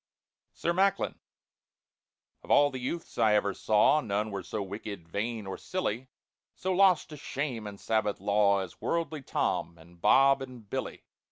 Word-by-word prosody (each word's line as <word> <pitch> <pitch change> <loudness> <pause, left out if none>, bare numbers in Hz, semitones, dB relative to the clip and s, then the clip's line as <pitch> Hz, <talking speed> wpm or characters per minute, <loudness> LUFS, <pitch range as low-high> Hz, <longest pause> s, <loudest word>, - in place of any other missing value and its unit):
SIR 170 - -1
MACKLIN 195 +2 +1 1.2
OF - - -16
all 145 0 +5
the 130 - -5
youths 165 +7 -5
I 105 -1 +5
ever 100 -1 +1
saw 110 +8 +3
None 105 -2 -2
were 100 -1 -3
so 105 +3 -4
wicked, 100 -3 -7
vain, 110 +4 -3
or 95 - -6
silly, 130 - -3 0.5
So 190 0 -1
lost 185 -4 +4
to 150 - -9
shame 135 -6 -4
and 100 -1 -9
Sabbath 110 -2 0
law, 100 0 +3
As 95 -3 -9
worldly 165 -3 -1
TOM, 85 -9 -1
and 85 +1 -18
BOB, 135 +5 +5
and 125 -5 -9
BILLY. - - -5
110 Hz, 160 wpm, -29 LUFS, 100-145 Hz, 1.2 s, all